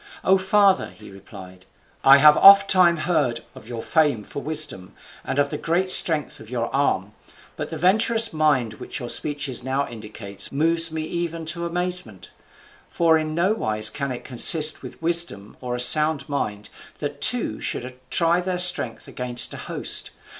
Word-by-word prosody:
"O 190 0 +2
father," 195 0 +1
he 105 -2 -16
replied, 95 -2 -15 0.4
"I 135 +1 +7
have 150 +1 +6
ofttimes 190 -4 +5
heard 145 -10 -1
of - - -15
your 115 -2 -7
fame 150 -9 0
for 140 - -9
wisdom, 150 -12 -4 0.3
and 130 - -5
of 145 0 0
the - - -5
great 180 +3 -1
strength 155 -5 +5
of 110 - -14
your 120 -2 -5
arm, 105 -8 -2 0.4
but - - -7
the 160 - -7
venturous 220 +6 +2
mind 145 -8 0
which - - -8
your 120 -2 -8
speeches 145 -4 -3
now 135 +2 -3
indicate 105 -3 -7
moves 165 +3 -1
me 160 0 -5
even 165 0 -5
to 170 +2 -4
amazement: 175 - -4 0.6
for 165 -1 +1
in 155 0 -5
nowise 110 - 0
can 140 +1 -5
it 125 - -8
consist 155 +5 +3
with - - -12
wisdom 165 -12 -1
or 125 -1 -5
a - - -6
sound 150 +3 +4
mind 105 -8 -5 0.3
that - - -7
two - - 0
should 125 +1 -5
try 170 +1 +1
their 180 0 -4
strengths 175 -11 +2
against 125 -1 -2
a - - -9
host. - - -1
150 Hz, 165 wpm, -21 LUFS, 120-170 Hz, 0.6 s, I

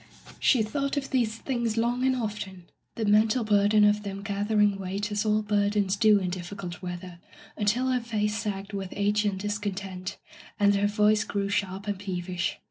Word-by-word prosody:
She 245 -5 +4
thought 275 +6 -2
of 275 -1 -3
these 235 -4 +1
things 235 -3 -2
long 240 +2 +1
and 260 0 +3
often, 210 -6 -5 0.3
the 225 - -2
mental 215 +3 +4
bur 205 -2 +3
den 210 0 +5
of 210 0 +4
them 200 -1 -6
gathering 205 0 +1
weight 195 +3 -3
as 210 +1 -1
all 215 0 +2
burdens 205 -1 +1
do 215 -1 +5
in 185 -2 -2
difficult 180 0 -6
weather, 180 -1 -7 0.4
until 230 +5 +1
her 250 - +2
face 210 -2 -1
sagged 205 -2 -4
with 195 -2 -4
age 205 +1 +1
and 195 -2 0
discontent, 195 -2 -4 0.4
and 205 0 +5
her 200 0 +2
voice 210 +1 +3
grew 200 -2 -2
sharp 200 -2 -2
and 205 -2 -3
peevish. 180 -2 -3
205 Hz, 180 wpm, -27 LUFS, 195-215 Hz, 0.4 s, den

